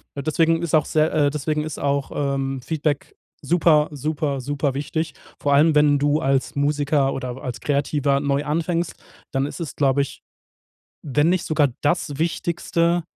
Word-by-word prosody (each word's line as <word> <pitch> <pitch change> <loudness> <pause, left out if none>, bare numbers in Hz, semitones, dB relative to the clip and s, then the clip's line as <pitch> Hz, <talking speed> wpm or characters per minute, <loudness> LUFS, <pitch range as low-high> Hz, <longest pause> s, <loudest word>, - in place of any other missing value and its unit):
Deswegen 165 +3 +1
ist 170 - -3
auch 155 - +4
sehr 155 0 +1
äh, 150 -2 +3
deswegen 150 +1 -2
ist 155 -2 -5
auch, 140 -1 -1
ähm, 135 -1 -1
Feedback 150 +1 -2 0.3
super, 160 -3 +4
super, 145 -1 -2
super 140 +1 -1
wichtig. 155 +2 -3 0.3
Vor 145 - +1
allem, 150 +2 +5
wenn 145 -1 +4
du 145 +2 +2
als 135 0 0
Musiker 145 -1 +1
oder 130 -1 -5
als 125 -2 -5
Kreativer 140 -1 +1
neu 140 0 0
anfängst, 165 +3 -1 0.4
dann 135 +1 0
ist 145 - -7
es 165 - -5
glaube 140 -1 +2
ich, 140 - -5 0.8
wenn 145 +2 +2
nicht 180 -1 +1
sogar 155 -2 +3
das 145 -2 0
Wichtigste, 170 +1 0
145 Hz, 160 wpm, -22 LUFS, 140-155 Hz, 0.8 s, allem